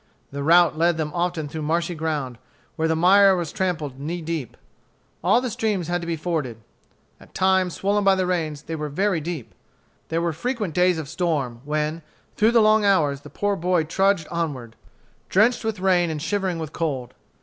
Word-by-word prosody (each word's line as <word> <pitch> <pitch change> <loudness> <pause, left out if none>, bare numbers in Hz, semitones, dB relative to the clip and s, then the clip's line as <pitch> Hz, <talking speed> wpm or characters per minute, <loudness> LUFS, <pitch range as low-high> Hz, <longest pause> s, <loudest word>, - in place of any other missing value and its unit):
The 140 0 -5
route 170 +2 +5
led 170 0 +3
them 155 -1 -2
often 170 -2 -1
through 155 +2 -6
marshy 170 +3 -1
ground, 150 -7 -3 0.4
where 160 - 0
the 160 - +1
mire 190 +3 +6
was 170 -4 -3
trampled 160 -9 -3
knee 165 +5 -4
deep. 160 -6 -5 0.7
All 200 +8 +4
the 250 -2 -3
streams 200 -6 -1
had 175 0 0
to 170 - -6
be 170 - -1
forded. 155 -8 -3 0.6
At - - -19
times, 185 -3 +2
swollen 205 +4 0
by 195 -1 +5
the 185 -1 0
rains, 160 -5 -2
they 160 - -5
were 150 -1 -4
very 185 +2 0
deep. 160 -6 -6 0.6
There 165 - 0
were 170 -1 -1
frequent 215 - -3
days 180 0 +3
of 155 -3 -5
storm, 150 -7 -2
when, 155 +2 -2 0.3
through 215 - +4
the 230 - +6
long 215 0 +4
hours, 150 -9 +2
the 150 - -12
poor 205 +7 -1
boy 180 -2 +1
trudged 190 +1 +1
onward, 140 -9 -4 0.5
drenched 225 +6 +3
with 220 -3 -2
rain 180 -2 +2
and 155 -1 -3
shivering 190 +1 -1
with 160 -1 -6
cold. 135 -7 -3
170 Hz, 190 wpm, -23 LUFS, 150-190 Hz, 0.7 s, mire